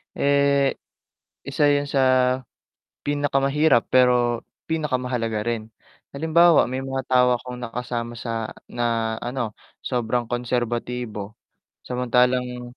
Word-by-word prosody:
Eh, 140 -1 +3 0.7
isa 145 +2 0
'yun 145 0 +2
sa 135 - +2 1.0
pinakamahirap 145 -1 +2
pero 125 -2 +3 0.2
pinakamahalaga 125 -8 -1
rin, 110 -1 -3 0.4
halimbawa 160 +1 +4
may 130 +1 -4
mga 135 0 -2
tao 125 -1 +4
akong 125 0 -8
nakasama 120 0 -4
sa 115 -1 -4 0.2
na 115 -2 -1
ano 120 -4 -3 0.2
sobrang 120 -1 -1
konserbatibo, 120 -3 -3 0.6
samantalang, 125 0 0
125 Hz, 95 wpm, -23 LUFS, 120-135 Hz, 1.0 s, halimbawa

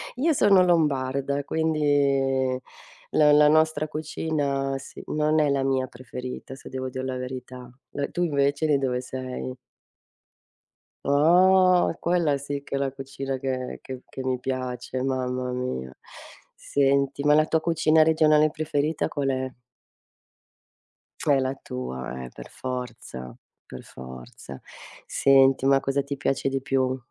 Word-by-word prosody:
Io 310 +5 +2
sono 200 -7 +5
lombarda 140 -4 +1
quindi 140 -5 +1 0.5
la 150 -1 +5
la 150 0 +6
nostra 155 0 +3
cucina 145 -3 -2
sì, 135 - -10
non 155 +1 +1
è 150 - +3
la 140 -1 +1
mia 130 -1 0
preferita 125 +1 -8
se - - -13
devo 130 0 -4
dir 130 0 -5
la 130 - -3
verità. 125 -1 -7 0.2
Eh, 140 0 -3
tu 175 - -1
invece 140 -1 +1
di 150 -2 +3
dove 130 -2 -1
sei? 130 0 -6 1.5
Oh, 180 +5 +4
quella 170 -5 +1
sì 140 +1 -5
che 140 - -5
è - - +1
la 135 -1 -1
cucina 135 0 -5
che 130 -1 -4
che 130 -1 -8
che - - -7
mi 130 -1 -1
piace, 130 0 -4
mamma 130 -1 -2
mia. 95 - -4 0.6
Senti, 140 0 0
ma 150 0 +5
la 155 0 +4
tua 160 0 +1
cucina 160 -1 +3
regionale 155 -1 +4
preferita 155 0 -1
qual 140 -2 -2
è? 130 0 -1 1.8
È 145 -2 +4
la 130 0 0
tua, 65 - -6
eh, 65 - -8
per - - -10
forza, 125 - -6 0.3
per 65 - -10
forza. 65 +1 -11 0.5
Senti, 135 -1 +4
ma 135 0 +4
cosa 140 +1 0
ti 140 +1 -5
piace 135 +1 -1
di 135 0 -1
più? 130 -1 0
135 Hz, 140 wpm, -25 LUFS, 130-150 Hz, 1.8 s, la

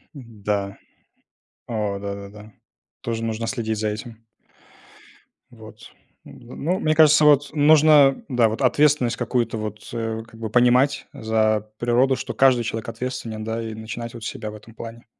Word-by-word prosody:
М-да. 105 -6 -4 0.9
А, 105 -4 -2
да, 100 0 -5
да, 100 0 -9
да. 105 +1 -14 0.5
Тоже 115 -1 -3
нужно 115 0 -3
следить 110 -3 -2
за 110 0 0
этим. 110 +2 -8 1.3
Вот. - - -14 0.3
Ну 120 +1 -13
ну, 180 +6 -1
мне 155 - +1
кажется, 155 -1 +6
вот, 145 -1 +4
нужно, 150 -2 +5
да, 120 -5 +2
вот, 110 - -5
ответственность 135 -2 +3
какую-то, 120 -1 -1
вот, 105 -1 -6
э, 115 -1 -3
как 115 - -16
бы 110 -1 -4
понимать 125 +4 +3
за 110 -1 0
природу, 125 +2 +2
что - - -5
каждый 130 -3 +4
человек 115 0 -4
ответственен, 115 -2 -5
да, 115 +1 -3
и 110 -1 -5
начинать 115 +2 -7
вот 115 -2 -9
с - - -1
себя 110 - -6
в - - -10
этом 110 +2 -14
плане. 115 +1 -10
115 Hz, 160 wpm, -22 LUFS, 110-130 Hz, 1.3 s, кажется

